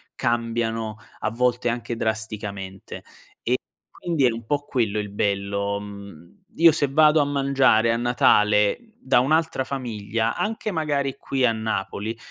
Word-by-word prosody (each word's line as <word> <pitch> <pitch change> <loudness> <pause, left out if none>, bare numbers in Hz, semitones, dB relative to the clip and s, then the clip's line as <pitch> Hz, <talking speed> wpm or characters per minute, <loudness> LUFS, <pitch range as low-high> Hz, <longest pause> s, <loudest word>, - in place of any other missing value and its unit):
cambiano 115 -2 -1 0.2
a - - -1
volte 120 +1 0
anche 120 0 -3
drasticamente, 105 -4 -5 0.4
e 125 +2 +1 0.3
quindi 165 -6 0
è 120 - +4
un 115 0 -7
po' 145 +1 -1
quello 115 -7 -1
il 105 -1 -4
bello. 100 0 -1
Uhm, 100 -5 -11 0.2
io 165 0 +7
se 145 -2 0
vado 155 +2 +5
a - - +2
mangiare 135 -5 +3
a - - 0
Natale 105 -3 +3 0.2
da 245 - +3
un'altra 155 +2 +1
famiglia, 115 -4 -3
anche 220 0 -2
magari 145 -5 -1
qui 135 -2 0
a 120 - +4
Napoli, 110 0 -3
115 Hz, 140 wpm, -23 LUFS, 105-135 Hz, 0.4 s, io